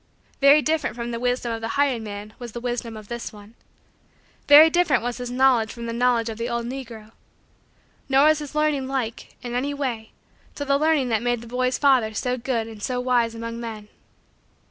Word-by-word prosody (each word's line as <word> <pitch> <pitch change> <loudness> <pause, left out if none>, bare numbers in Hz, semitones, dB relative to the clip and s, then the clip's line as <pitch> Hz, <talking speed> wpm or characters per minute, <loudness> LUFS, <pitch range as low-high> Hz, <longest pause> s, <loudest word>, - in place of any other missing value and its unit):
Very 285 +2 +6
different 315 -7 -1
from 235 0 -5
the 230 - -4
wisdom 245 -1 -1
of 225 0 -4
the 225 - -3
hired 275 -5 +2
man 210 0 -8
was 240 -3 -8
the 240 - -5
wisdom 235 -2 -4
of 215 -1 -11
this 235 +1 -6
one. 210 +1 -14 0.9
Very 295 +2 +10
different 320 -7 +2
was 245 0 -3
his 245 -1 -5
knowledge 245 -3 +3
from 235 -1 -8
the 230 - -4
knowledge 240 -1 +1
of 225 0 -6
the 235 +1 -2
old 235 0 -2
negro. 235 -4 -8 1.0
Nor 270 +1 +5
was 310 0 +4
his 295 0 -8
learning 300 -3 +1
like, 255 -4 -4
in 240 -1 -5
any 275 +4 -1
way, 240 -6 -4 0.4
to 285 - -4
the 280 0 +2
learning 305 -4 +2
that 220 -2 +1
made 240 -1 -1
the 235 - -11
boy's 255 +2 -1
father 255 -6 +3
so 250 +4 -1
good 240 -2 -2
and 220 -2 -11
so 250 +3 -2
wise 245 -2 +1
among 230 0 -6
men. 220 -3 -7
245 Hz, 205 wpm, -23 LUFS, 230-270 Hz, 1.0 s, Very